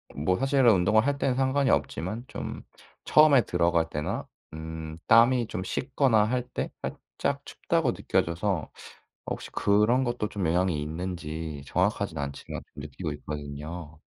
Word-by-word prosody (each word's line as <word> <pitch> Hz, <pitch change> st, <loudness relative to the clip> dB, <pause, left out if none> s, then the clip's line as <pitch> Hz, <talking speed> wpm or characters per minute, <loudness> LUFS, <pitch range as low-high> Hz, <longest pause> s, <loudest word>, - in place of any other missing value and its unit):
뭐 85 Hz, +6 st, +1 dB
사실은 135 Hz, -2 st, +4 dB
운동을 105 Hz, +5 st, +3 dB
할 145 Hz, 0 st, +1 dB
때는 135 Hz, -2 st, +1 dB
상관이 135 Hz, +1 st, +2 dB
없지만 105 Hz, +8 st, -1 dB
좀 -, -, -6 dB, 0.4 s
처음에 150 Hz, -4 st, +6 dB
들어갈 85 Hz, -4 st, +1 dB
때나 75 Hz, +1 st, -3 dB, 0.3 s
음 80 Hz, 0 st, -6 dB
땀이 120 Hz, +1 st, +5 dB
좀 95 Hz, -, -4 dB
식거나 125 Hz, +1 st, +2 dB
할 125 Hz, +2 st, -1 dB
때 -, -, -3 dB
살짝 -, -, -4 dB
춥다고 -, -, 0 dB
느껴져서 85 Hz, 0 st, -1 dB, 0.6 s
혹시 -, -, -4 dB
그런 105 Hz, +6 st, +3 dB
것도 120 Hz, -4 st, -2 dB
좀 100 Hz, -5 st, -2 dB
영향이 85 Hz, -2 st, +1 dB
있는지 80 Hz, -2 st, -5 dB
정확하진 -, -, 0 dB
않지만 70 Hz, -1 st, -5 dB
느끼고 75 Hz, -1 st, -5 dB
있거든요. 75 Hz, +2 st, -7 dB
90 Hz, 295 characters per minute, -27 LUFS, 80-120 Hz, 0.6 s, 처음에